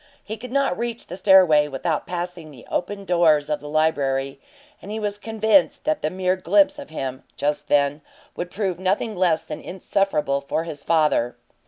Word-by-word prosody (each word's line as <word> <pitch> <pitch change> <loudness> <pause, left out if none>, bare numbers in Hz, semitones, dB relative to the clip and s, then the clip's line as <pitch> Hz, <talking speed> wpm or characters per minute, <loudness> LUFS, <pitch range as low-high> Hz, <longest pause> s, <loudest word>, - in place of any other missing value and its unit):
He 215 - -5
could 235 +3 -9
not 275 -8 +1
reach 235 0 -3
the - - -7
stairway 180 -7 +5
without 150 +3 -2
passing 175 -2 -5
the 130 -5 -14
open 200 +2 -3
doors 160 -5 +3
of 150 - 0
the 145 - -9
library, 140 -3 0 0.4
and 200 - -10
he 215 +1 -3
was 205 -1 -3
convinced 220 -4 +2
that 155 - 0
the 155 - 0
mere 185 +1 0
glimpse 290 +9 +3
of 285 - -9
him, 130 -4 -5 0.2
just 150 0 -1
then, 145 +1 +2 0.3
would 175 - -4
prove 190 -3 -2
nothing 195 +4 0
less 175 -3 +2
than 150 - -7
insufferable 175 -7 -1
for 140 +3 -2
his 155 -4 -8
father. 150 -7 +2
175 Hz, 180 wpm, -23 LUFS, 150-200 Hz, 0.4 s, stairway